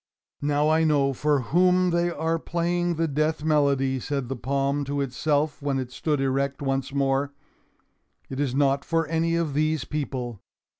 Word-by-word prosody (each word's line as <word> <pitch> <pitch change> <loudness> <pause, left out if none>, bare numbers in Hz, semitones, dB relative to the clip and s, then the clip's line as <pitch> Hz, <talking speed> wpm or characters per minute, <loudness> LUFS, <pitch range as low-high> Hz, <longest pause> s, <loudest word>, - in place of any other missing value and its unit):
"Now 145 +1 +1
I 160 +1 +3
know 145 -3 +2
for 145 +1 +1
whom 180 +6 +3
they 170 +1 +1
are 165 0 -1
playing 175 +1 -1
the 165 +1 0
death 155 +1 0
melody," 140 -4 +2
said 135 -1 -3
the 135 - -2
palm 140 +3 -1
to 140 +1 -2
itself 145 +3 0
when 140 -1 -1
it 130 -1 -4
stood 145 +3 -1
erect 135 +1 0
once 135 -1 -2
more. 140 0 0 0.9
"It 135 - -6
is 135 -3 0
not 140 0 +2
for 165 -1 0
any 165 +1 0
of 165 -4 -1
these 155 +1 0
people." 125 -7 -4
145 Hz, 165 wpm, -25 LUFS, 135-160 Hz, 0.9 s, I